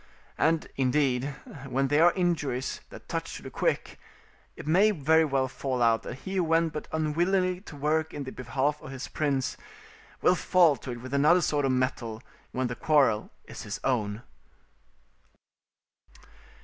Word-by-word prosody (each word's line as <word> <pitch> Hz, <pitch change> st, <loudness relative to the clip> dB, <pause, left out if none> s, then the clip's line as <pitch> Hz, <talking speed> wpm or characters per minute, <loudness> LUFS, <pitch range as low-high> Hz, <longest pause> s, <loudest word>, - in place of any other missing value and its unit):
And, 160 Hz, 0 st, +2 dB
indeed, 130 Hz, -1 st, +2 dB, 0.4 s
when 135 Hz, +1 st, 0 dB
they 145 Hz, +2 st, +3 dB
are 175 Hz, +2 st, +7 dB
injuries 160 Hz, -8 st, -1 dB
that -, -, -12 dB
touch -, -, -4 dB
to -, -, -12 dB
the -, -, -8 dB
quick, -, -, -1 dB, 0.6 s
it -, -, -9 dB
may 185 Hz, +8 st, +5 dB
very 160 Hz, -3 st, +3 dB
well 135 Hz, -3 st, +1 dB
fall 130 Hz, 0 st, -3 dB
out 115 Hz, -2 st, +3 dB
that -, -, -7 dB
he 190 Hz, 0 st, -4 dB
who 185 Hz, -, +3 dB
went 165 Hz, 0 st, +2 dB
but 150 Hz, -, -5 dB
unwillingly 180 Hz, +4 st, +1 dB
to 170 Hz, -, -11 dB
work 155 Hz, +2 st, 0 dB
in 145 Hz, -, -5 dB
the 130 Hz, -, -6 dB
behalf 135 Hz, +4 st, -1 dB
of -, -, -9 dB
his 135 Hz, -1 st, -6 dB
prince 140 Hz, -4 st, -1 dB, 0.7 s
will -, -, +6 dB
fall 175 Hz, -3 st, +4 dB
to't 120 Hz, -3 st, -7 dB
with 130 Hz, +2 st, -8 dB
another 150 Hz, +6 st, +5 dB
sort 145 Hz, -3 st, +1 dB
of 135 Hz, -, +2 dB
mettle 125 Hz, -3 st, -2 dB, 0.3 s
when 130 Hz, 0 st, -1 dB
the 125 Hz, -, -2 dB
quarrel 135 Hz, -9 st, +2 dB, 0.2 s
is -, -, -9 dB
his -, -, -5 dB
own. 110 Hz, -3 st, -1 dB
145 Hz, 160 wpm, -28 LUFS, 130-160 Hz, 0.7 s, are